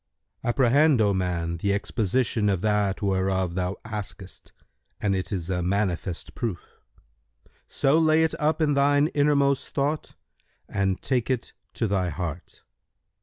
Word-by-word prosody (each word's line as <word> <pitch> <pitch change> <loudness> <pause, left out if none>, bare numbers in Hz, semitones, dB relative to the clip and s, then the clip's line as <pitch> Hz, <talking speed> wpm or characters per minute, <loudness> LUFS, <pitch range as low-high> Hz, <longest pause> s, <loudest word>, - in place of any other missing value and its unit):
"—"Apprehend, 135 +3 +4
O 105 -2 +3
man, 85 -3 -1
the 100 +4 0
exposition 110 +1 0
of 95 -3 0
that 105 -1 0
whereof 95 -2 0
thou 90 +1 -2
askest 105 -3 -8 0.5
and 100 -2 +1
it 95 - -3
is 90 -5 -3
a 90 -1 0
manifest 90 -1 -2
proof; 110 -8 -5 0.9
so 140 +4 +2
lay 160 0 +4
it 160 - +1
up 155 +1 +1
in 145 -1 +2
thine 145 +2 +3
innermost 140 -2 +2
thought 145 +2 -2 0.5
and 95 -1 -1
take 125 -3 0
it 125 -2 -2 0.2
to 115 - 0
thy 95 -3 0
heart. 85 +1 -6
105 Hz, 135 wpm, -25 LUFS, 95-140 Hz, 0.9 s, Apprehend